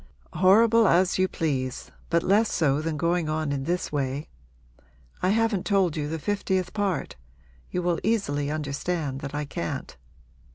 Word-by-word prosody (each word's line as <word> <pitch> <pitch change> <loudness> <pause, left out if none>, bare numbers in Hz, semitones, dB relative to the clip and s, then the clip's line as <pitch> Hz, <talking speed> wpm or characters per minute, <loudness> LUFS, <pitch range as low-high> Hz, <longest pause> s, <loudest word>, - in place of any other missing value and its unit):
'Horrible 220 +4 +5
as 185 +1 +3
you 185 - +4
please, 135 -8 -3 0.2
but 170 0 +2
less 210 +4 +3
so 145 -3 +2
than 160 -1 -2
going 170 0 0
on 155 -1 -1
in 135 -1 -2
this 175 +3 -1
way; 140 0 -2 0.9
I 185 - +2
haven't 225 -2 +1
told 190 -5 +2
you 150 -2 -2
the 160 - -2
fiftieth 190 0 -1
part 200 - -2 0.5
you 180 - -2
will 175 -1 +1
easily 145 -10 0
understand 150 -1 -2
that 140 +1 -6
I 150 0 -2
can't. 85 - -5
170 Hz, 155 wpm, -26 LUFS, 145-190 Hz, 0.9 s, Horrible